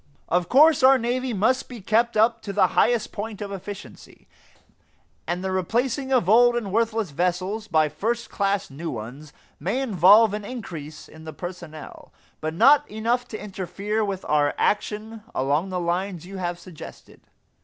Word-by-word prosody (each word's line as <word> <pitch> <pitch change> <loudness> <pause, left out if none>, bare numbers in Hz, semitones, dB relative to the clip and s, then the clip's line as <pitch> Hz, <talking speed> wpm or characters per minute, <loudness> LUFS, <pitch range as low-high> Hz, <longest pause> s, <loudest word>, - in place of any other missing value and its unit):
Of 175 0 +1
course 305 +4 +6
our 265 +1 +7
navy 250 +1 -2
must 235 +5 +1
be 245 -2 -8
kept 225 +3 +1
up 225 +1 +3
to 200 - -5
the 195 -2 +3
highest 235 -3 +2
point 210 0 -6
of 205 -1 -6
efficiency, 200 +1 -10 1.0
and 175 +1 -2
the 190 - -2
replacing 240 - -1
of 250 -9 +2
old 240 +3 +5
and 220 -5 -3
worthless 225 -3 0
vessels 185 +7 -2
by 155 -4 +3
first 225 +11 -3
class 200 -4 -1
new 160 +5 -6
ones 130 +6 -8 0.3
may 190 - -1
involve 210 -2 +5
an 210 0 -4
increase 170 - -8
in 160 0 -14
the 155 - -7
personnel; 175 -2 -9 0.3
but 155 +1 -4
not 290 - +5
enough 235 +3 -1
to 215 - -7
interfere 200 +2 -3
with 195 -2 -4
our 145 -1 +1
action 215 +2 -1
along 145 +8 0
the 185 -1 -2
lines 175 0 -2
you 195 +1 -8
have 175 -1 -3
suggested. 175 -2 -12
200 Hz, 165 wpm, -24 LUFS, 175-230 Hz, 1.0 s, our